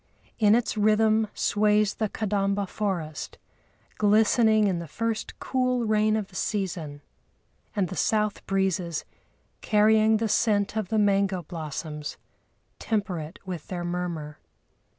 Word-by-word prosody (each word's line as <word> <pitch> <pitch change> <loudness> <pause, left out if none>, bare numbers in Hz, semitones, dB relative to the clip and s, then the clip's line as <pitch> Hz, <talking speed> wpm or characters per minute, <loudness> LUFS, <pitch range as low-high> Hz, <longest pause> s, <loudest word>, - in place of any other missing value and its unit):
In 210 -1 +5
its 240 -1 0
rhythm 215 +1 +3
sways 210 0 +2
the 215 -2 -2
Kadamba 200 -1 -1
forest, 180 -7 -4 0.6
glistening 215 +1 +4
in 185 -4 +1
the 170 - -7
first 225 +7 -3
cool 255 -2 0
rain 215 0 +2
of 210 -3 -2
the 185 - -17
season; 170 -9 -3 0.7
and 200 -3 +1
the 185 - -7
south 210 0 0
breezes, 185 -4 -1 0.6
carrying 215 +1 +4
the 225 +1 -1
scent 210 -1 +1
of 215 -4 -2
the 220 - 0
mango 195 -3 +2
blossoms, 150 -2 -6 0.6
temper 200 -6 -1
it 155 +4 -8
with 180 -5 -6
their 175 -2 -4
murmur. 170 -4 -4
205 Hz, 130 wpm, -26 LUFS, 180-215 Hz, 0.7 s, In